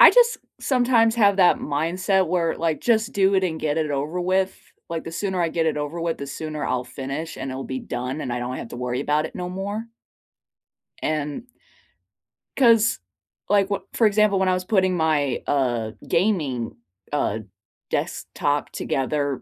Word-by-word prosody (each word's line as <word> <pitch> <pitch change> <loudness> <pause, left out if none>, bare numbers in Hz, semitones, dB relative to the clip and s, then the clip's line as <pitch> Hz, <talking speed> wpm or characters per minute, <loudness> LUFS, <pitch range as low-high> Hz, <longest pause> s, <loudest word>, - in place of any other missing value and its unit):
I - - +11
just 475 -1 +5 0.2
sometimes 245 -3 +3
have 200 -3 +5
that 180 -2 +5
mindset 180 +6 +1
where, 170 -1 +1
like, 165 -2 -1
just 225 0 +2
do 195 0 +3
it 190 -1 +3
and 160 -3 -2
get 150 -1 0
it 155 -2 0
over 145 +5 -2
with. 185 +1 +1 0.3
Like, 165 -1 -4
the 165 - -6
sooner 190 0 -1
I 165 - +2
get 165 0 0
it 160 - +1
over 150 +3 -3
with, 165 -1 -1
the 140 - -5
sooner 155 +1 -4
I'll 125 0 -1
finish 140 +6 -5
and 135 - -4
it'll 130 +1 -5
be 130 0 -4
done 125 +4 -4
and 125 - -3
I 120 - -1
don't 125 +1 -3
have - - -6
to - - -8
worry 125 +1 -2
about 150 +2 +1
it - - -12
no 180 -1 -4
more. 200 +4 -4 1.2
And 150 -2 -2 1.1
'Cause, 230 -4 +5 0.5
like 200 -1 +3
wh 200 - 0
for 230 - +3
example, 210 -1 +3
when 190 -1 +2
I - - +3
was 185 0 -2
putting 185 -2 +2
my, 155 -5 +1
uh, 120 -6 +1 0.2
gaming, 155 - 0 0.4
uh, 110 -7 0 0.5
desktop 145 0 -1
together, 140 0 -1
165 Hz, 180 wpm, -24 LUFS, 145-195 Hz, 1.2 s, I